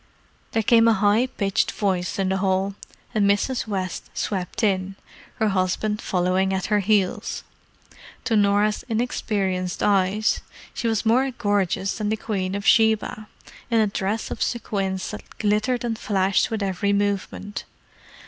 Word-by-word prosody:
There 225 - +1
came 230 +1 +5
a 230 - +6
high 210 +5 +3
pitched 200 -6 0
voice 185 -4 -1
in 195 -1 0
the 190 - +1
hall, 190 0 0 0.4
and 205 -3 +3
Mrs. 225 +5 0
West 185 -4 -3
swept 190 +2 -3
in, 195 -2 +1 0.4
her 220 - +1
husband 200 +3 0
following 185 +1 +1
at 190 - -2
her 210 - +4
heels. 200 -2 0 0.8
To 235 -3 +1
Norah's 205 +1 +2
inexperienced 200 -6 -1
eyes, 200 +1 +2 0.3
she 235 - -2
was 225 -1 0
more 255 +5 +3
gorgeous 205 -4 0
than 210 -1 -1
the 220 - 0
Queen 195 -4 -2
of 200 0 -4
Sheba, 220 -1 +3 0.4
in 230 -1 +3
a 220 - +4
dress 200 +2 -2
of - - -5
sequins 195 -5 -2
that 210 - -10
glittered 220 +4 +1
and 230 -2 -2
flashed 195 -1 +1
with 220 -2 -2
every 195 +1 0
movement. 205 0 -2
205 Hz, 150 wpm, -23 LUFS, 190-220 Hz, 0.8 s, a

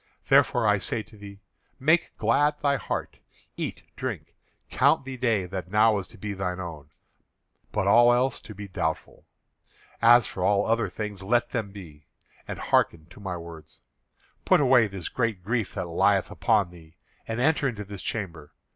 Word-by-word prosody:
Therefore - - +4
I - - +3
say 110 - -3
to 110 - -18
thee: 100 -1 -12 0.4
Make 160 +6 +2
glad 145 +7 +2
thy 140 -1 +2
heart; - - -5 0.4
eat, - - -5
drink, - - -5 0.4
count - - +3
the 135 -1 -6
day 115 -6 +1
that 90 -1 -6
now 105 +1 +4
is 95 - -6
to - - -15
be 105 +1 -5
thine 95 -1 -3
own, 80 -5 -7 0.8
but 105 -2 -1
all 120 +4 +6
else 125 +1 +1
to 110 - -12
be 100 +1 -8
doubtful. 80 -4 -4 0.7
As 120 +1 +7
for 90 - -5
all 100 +1 +3
other 115 0 +1
things, 105 -3 -6
let 120 +4 +1
them 110 -4 -2
be, 85 -7 -12 0.4
and - - -5
hearken 80 -2 +1
to 90 - -14
my 95 -3 -4
words. 85 -2 -12 0.6
Put - - +4
away 125 -5 +5
this 95 -4 -6
great 115 -7 -2
grief 115 +1 -2
that - - -2
lieth - - +2
upon 95 -4 +1
thee, 80 -2 -16 0.3
and 115 +1 -3
enter 150 +1 +2
into 105 -5 -4
this 100 -1 -9
chamber. 85 -9 -5
105 Hz, 175 wpm, -26 LUFS, 90-120 Hz, 0.8 s, As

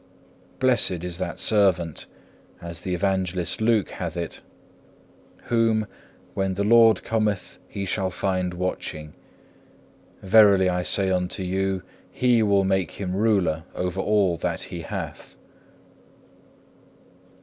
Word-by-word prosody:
Blessed 120 -9 +2
is 90 -1 -5
that 85 - -4
servant, 90 -7 +1 0.5
as 85 -1 -7
the 90 -1 -2
Evangelist 95 -1 -1
Luke 110 -3 +2
hath 85 -2 -5
it, 85 -1 -5 1.0
whom, 115 -2 +1 0.5
when 95 -1 -1
the 100 - -1
Lord 115 +1 +5
cometh 105 -4 -2
He 100 - -5
shall 95 0 -1
find 90 -1 -2
watching. 75 -4 -4 1.1
Verily 100 -2 +5
I 90 0 0
say 95 +1 +3
unto 90 +1 -1
you 95 0 -1 0.3
He 125 -2 +2
will 100 -2 +3
make 95 -3 0
him 95 -2 -4
ruler 95 -7 +1
over 90 +1 -2
all 100 -5 +2
that - - -3
He - - -5
hath. - - -7
95 Hz, 115 wpm, -24 LUFS, 90-105 Hz, 1.1 s, Lord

